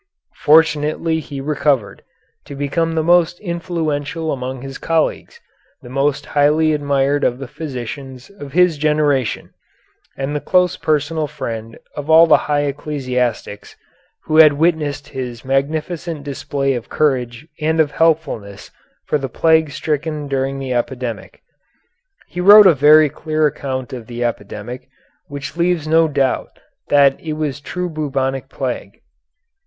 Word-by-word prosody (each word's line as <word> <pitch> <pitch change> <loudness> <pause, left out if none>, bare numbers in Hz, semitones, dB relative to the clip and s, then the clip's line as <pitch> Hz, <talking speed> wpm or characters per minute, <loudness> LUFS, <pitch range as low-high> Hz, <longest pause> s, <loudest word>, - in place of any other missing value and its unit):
Fortunately 160 +1 +3
he 140 -2 -7
recovered, 140 -5 -1 0.4
to 145 - -9
become 165 +4 -1
the 160 - +1
most 175 +1 +3
influential 165 -3 -3
among 130 -1 -5
his 135 0 -8
colleagues, 165 -1 -1 0.4
the 120 - -11
most 140 +1 0
highly 150 +2 +2
admired 145 -1 0
of 120 - +1
the 135 0 -7
physicians 130 -2 -7
of 145 -9 -11
his 180 -3 +3
generation, 150 -5 0 0.7
and 135 +2 -3
the - - 0
close 180 -1 +2
personal 155 +1 -1
friend 115 -4 -6 0.2
of 145 +1 -6
all 160 +1 +8
the 160 - +5
high 145 -1 +2
ecclesiastics, 125 -7 -3 0.5
who 155 - 0
had 155 -2 +8
witnessed 145 -2 0
his 125 -3 -6
magnificent 150 +3 -2
display 140 -1 -2
of 120 -3 -6
courage 130 -2 -1
and 160 +1 0
of 150 -2 +3
helpfulness 150 -13 -1 0.3
for 150 - 0
the 135 -1 -4
plague 160 +3 +2
stricken 150 +1 -3
during 135 0 -2
the 135 -2 -3
epidemic. 120 -1 -4 0.8
He 180 - -6
wrote 205 +3 +9
a 185 - +7
very 150 +2 +6
clear 155 -1 -1
account 130 -3 -3
of 120 -3 -8
the 120 0 -4
epidemic, 120 +3 -5 0.4
which 140 +1 -7
leaves 170 -3 0
no 160 +1 +4
doubt 140 -3 -1 0.3
that 140 -1 +4
it 155 -2 -5
was 150 -3 -3
true 180 +4 -4
bubonic 135 -4 -3
plague. 130 -3 -5
145 Hz, 140 wpm, -18 LUFS, 135-160 Hz, 0.8 s, wrote